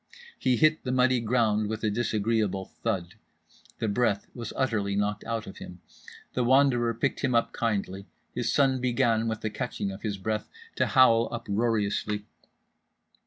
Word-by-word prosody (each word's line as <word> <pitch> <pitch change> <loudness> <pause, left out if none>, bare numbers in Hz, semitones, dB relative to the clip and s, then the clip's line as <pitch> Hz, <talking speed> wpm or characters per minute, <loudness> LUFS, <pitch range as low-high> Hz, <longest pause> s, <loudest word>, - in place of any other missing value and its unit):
He 125 -2 +2
hit 155 +5 +3
the 125 - -2
muddy 130 0 +3
ground 110 -2 +1
with 110 0 -4
a 110 - +1
disagreeable 110 -3 0 0.2
thud. 95 -7 -2 0.6
The 110 - -2
breath 105 -1 +1
was 115 -3 -6
utterly 105 -6 0
knocked 105 +1 -1
out 115 -1 -3
of 95 - -10
him. 90 0 -10 0.5
The 125 - 0
Wanderer 120 -2 +3
picked 135 +4 -1
him 125 - 0
up 115 - +1
kindly. 100 -4 -2 0.3
His - - -1
son 135 -2 +2
began, 115 -2 +2
with 110 -1 -3
the 110 - -2
catching 105 -4 -3
of 95 - -9
his 105 -3 -3
breath, 110 +3 -3 0.3
to - - +2
howl 115 -3 +5
uproariously. 105 -2 -1
115 Hz, 160 wpm, -27 LUFS, 105-120 Hz, 0.6 s, howl